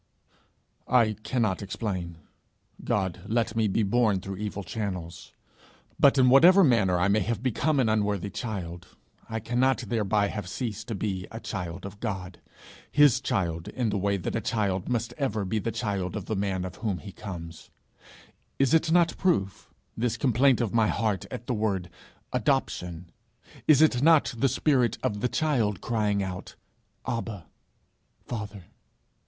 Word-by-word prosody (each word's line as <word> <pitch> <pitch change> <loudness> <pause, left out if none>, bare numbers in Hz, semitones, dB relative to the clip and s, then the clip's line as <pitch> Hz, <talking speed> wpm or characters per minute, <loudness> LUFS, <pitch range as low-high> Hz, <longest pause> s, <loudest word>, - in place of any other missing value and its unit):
'I 115 -4 +3
cannot 110 -6 0
explain. 95 -4 -4 0.7
God 95 -3 -1
let 115 0 0
me 110 -1 +2
be 105 +3 +1
born 105 -1 +2
through 95 +1 -6
evil 105 -1 -4
channels. 90 -4 -5 0.7
But 140 0 +6
in 130 -1 +5
whatever 180 +8 +8
manner 105 - +3
I 90 +2 +2
may 100 +2 +3
have 115 +3 -2
become 140 +4 +1
an 125 - +3
unworthy 105 -2 0
child, 90 -5 -5 0.4
I 110 0 -2
cannot 125 +4 +1
thereby 105 -2 +1
have 105 -4 -5
ceased 110 -2 -4
to 115 - -3
be 95 -2 -3
a 115 - -7
child 90 -4 -5
of 100 +1 -9
God 95 -5 -5 0.5
his 145 -3 +5
child 90 -11 -1
in 120 -4 -2
the 100 - 0
way 100 +1 +1
that 90 - -4
a 115 - 0
child 105 -5 -1
must 120 -1 -1
ever 110 -7 -1
be 110 +4 -1
the 115 - -2
child 100 -6 -2
of - - -4
the 110 - -2
man 95 -2 -1
of 90 0 -7
whom 105 -5 -2
he 100 - -9
comes. 85 -5 -8 0.9
Is 135 +2 +2
it 160 0 +3
not 170 -1 +4
proof 100 - 0 0.3
this 120 0 -1
complaint 130 0 +3
of 110 -5 -1
my 110 -2 +4
heart 105 -6 -1
at 120 - -7
the 125 - -1
word 100 -5 -1 0.4
Adoption? 85 -1 -1 0.6
Is 155 0 +7
it 125 -6 +3
not 160 -2 +5
the 130 +4 +2
spirit 125 -4 +2
of 105 - -1
the 125 - 0
child, 120 - 0
crying 105 -3 0
out, 90 -1 -6 0.5
"Abba, 115 -7 -4 0.8
Father"?' 105 -4 -6
105 Hz, 160 wpm, -27 LUFS, 95-120 Hz, 0.9 s, whatever